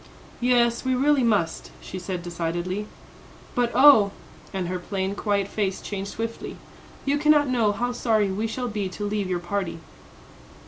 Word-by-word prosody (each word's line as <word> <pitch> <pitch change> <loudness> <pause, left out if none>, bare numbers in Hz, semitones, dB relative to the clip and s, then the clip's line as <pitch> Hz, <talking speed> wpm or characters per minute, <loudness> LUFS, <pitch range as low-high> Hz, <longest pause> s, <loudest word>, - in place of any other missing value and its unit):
"Yes; 240 -1 +3
we 260 -1 +1
really 280 +2 +3
must," 205 -9 +1
she 185 - -7
said 180 -1 -4
decidedly. 175 +4 -3 0.7
"But 245 -1 +1
oh," 255 -6 +8 0.4
and 190 -3 -2
her 180 +1 -2
plain, 190 +1 -2
quiet 200 -1 0
face 200 -2 -1
changed 195 -1 -5
swiftly, 230 +2 -5 0.5
"you 285 +1 +1
cannot 300 -1 +4
know 235 -5 +2
how 245 +4 -1
sorry 220 -5 +1
we 215 +4 -1
shall 250 +3 -3
be 210 -4 -2
to 205 +3 -5
leave 205 -2 -1
your 180 - 0
party." 175 0 -3
205 Hz, 155 wpm, -25 LUFS, 190-245 Hz, 0.7 s, oh